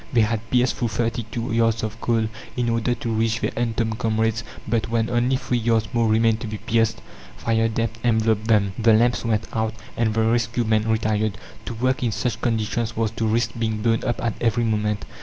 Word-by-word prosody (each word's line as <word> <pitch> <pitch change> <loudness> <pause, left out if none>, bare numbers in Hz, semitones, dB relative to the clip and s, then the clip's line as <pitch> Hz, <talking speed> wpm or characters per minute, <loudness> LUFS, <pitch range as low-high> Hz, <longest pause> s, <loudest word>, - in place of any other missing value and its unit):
They 120 - +4
had 110 +1 -1
pierced 125 0 +2
through 120 - 0
thirty 115 0 -2
two 115 +1 -3
yards 115 -1 +2
of 110 +1 -4
coal 115 -2 +1 0.3
in 120 -1 +1
order 115 +1 +1
to 115 - -5
reach 110 +1 +1
their - - -1
entombed 115 -1 -1
comrades; 110 -1 0 0.2
but 110 -1 0
when 115 0 0
only 120 +2 +2
three 125 -1 -1
yards 115 -1 +1
more 115 -1 +2
remained 110 0 +3
to 115 - -5
be 105 0 -4
pierced, 115 +1 0 0.3
fire 115 0 +1
damp 115 0 -2
enveloped 110 -2 +2
them. 100 -4 +3
The 115 0 +5
lamps 120 +3 +3
went 110 -2 0
out, 110 -1 -1 0.2
and 115 -2 +1
the 110 - +2
rescue 115 +1 +1
men 110 0 +1
retired. 110 -2 0 0.3
To 120 - -5
work 130 +3 0
in 120 -3 +1
such 115 0 -2
conditions 115 -1 -1
was 110 -1 0
to 115 0 -2
risk 115 +1 +1
being 110 -2 -1
blown 115 -1 +2
up 120 - -1
at 115 -2 0
every 120 0 +2
moment. 105 -2 0
115 Hz, 210 wpm, -23 LUFS, 110-115 Hz, 0.3 s, The